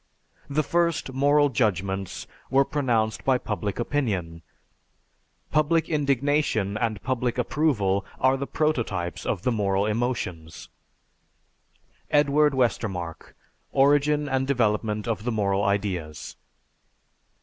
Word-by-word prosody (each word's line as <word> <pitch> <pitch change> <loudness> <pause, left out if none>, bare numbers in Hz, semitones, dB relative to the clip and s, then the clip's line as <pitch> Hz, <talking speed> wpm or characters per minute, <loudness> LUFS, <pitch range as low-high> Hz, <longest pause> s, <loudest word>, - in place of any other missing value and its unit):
The 150 +2 +1
first 170 -3 0
moral 145 +2 +3
judgments 95 -5 -1 0.2
were 135 +1 +4
pronounced 120 -7 0
by 130 -1 +3
public 105 -4 -4
opinion; 100 - -2 1.1
public 155 +2 +2
indignation 140 -7 +1
and 110 -2 -1
public 125 -2 -1
approval 120 -8 +1 0.2
are 130 +1 +4
the 135 +1 -4
prototypes 115 - -1
of 90 - -2
the 125 - +1
moral 100 -3 +1
emotions." 105 -8 -3 1.4
(_Edward 145 0 +3
Westermarck: 95 -9 -2 0.4
"Origin 145 +2 +3
and 130 -1 0
Development 110 -4 0
of 110 -3 -2
the 120 - -1
Moral 100 -2 0
Ideas." 95 -6 -2
120 Hz, 105 wpm, -25 LUFS, 100-140 Hz, 1.4 s, were